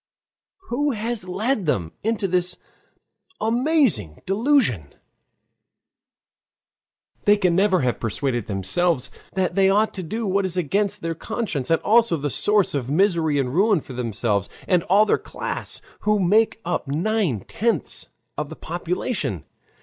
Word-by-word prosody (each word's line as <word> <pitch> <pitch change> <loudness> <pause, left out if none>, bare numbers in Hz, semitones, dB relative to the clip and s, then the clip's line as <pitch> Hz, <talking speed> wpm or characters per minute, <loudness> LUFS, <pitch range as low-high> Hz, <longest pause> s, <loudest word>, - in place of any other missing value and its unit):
Who 285 +3 0
has 220 -3 -3
led 210 - -1
them 85 - 0
into 220 -2 0
this 180 0 0 0.8
amazing 230 - +1
delusion? 195 - +1 2.3
They 205 0 +6
can 180 -4 +2
never 190 -2 +3
have 125 -2 0
persuaded 120 +2 -2
themselves 125 - 0 0.2
that 185 -3 0
they 195 +1 +4
ought 210 +3 +2
to 190 - -5
do 220 +7 -4
what 200 0 +1
is 185 -1 -1
against 200 +5 0
their 165 0 -1
conscience, 165 - -3
and 165 - +3
also 225 -5 +4
the 145 -1 -3
source 210 +5 +2
of 135 -3 -2
misery 165 -2 +2
and 130 -2 -1
ruin 200 +2 +3
for 135 - -10
themselves, 110 -4 -1 0.2
and 180 -3 +3
all 200 +4 +5
their - - +2
class, - - -6 0.2
who 210 0 +1
make 210 +5 +3
up 175 -4 -2
nine 165 - 0
tenths 220 - -1 0.3
of 150 -1 -3
the - - -8
population. 170 - -3
180 Hz, 140 wpm, -23 LUFS, 140-210 Hz, 2.3 s, They